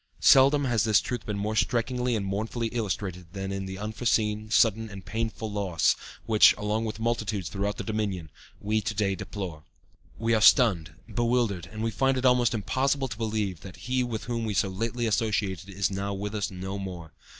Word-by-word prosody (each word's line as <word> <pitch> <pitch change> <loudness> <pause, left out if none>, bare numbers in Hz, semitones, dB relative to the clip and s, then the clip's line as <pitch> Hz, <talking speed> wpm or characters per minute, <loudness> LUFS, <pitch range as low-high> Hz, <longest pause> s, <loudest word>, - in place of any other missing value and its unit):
Seldom 140 +2 +6
has 120 -5 +2
this 110 -2 +4
truth 120 -3 -5
been 105 -1 -2
more 105 +2 -2
strikingly 125 +1 0
and 100 -3 -2
mournfully 110 +4 -2
illustrated 95 -6 -4
than 95 0 -4
in 95 -1 -4
the 95 0 -6
unforeseen, 110 0 0
sudden 110 -1 +3
and 100 -2 -10
painful 110 +1 -3
loss 95 -6 +1 0.3
which, 110 -2 +6
along 105 +2 -1
with 110 0 -5
multitudes 110 -5 -1
throughout 100 +1 -2
the - - -4
Dominion, 100 -8 -3 0.3
we 110 +1 0
to 105 - -3
day 100 -1 +1
deplore. 90 -5 -6 0.5
"We 115 0 +1
are 110 - +3
stunned, 95 - +5
bewildered, 115 -7 0
and 110 0 -5
we 115 - 0
find 135 +3 +1
it 130 - -1
almost 125 -2 +4
impossible 135 +5 0
to 110 - -7
realize 100 -6 -2
that 95 - -10
he 130 +1 +1
with 115 -3 -4
whom 115 -1 -3
we 110 -2 -2
so 95 - +2
lately 115 +5 -2
associated 105 -4 -1
is 100 +1 -1
now 100 +1 -3
with 100 +2 -4
us 105 -2 -1
no 95 +1 -5
more. 90 -5 -7
105 Hz, 190 wpm, -27 LUFS, 95-115 Hz, 0.5 s, Seldom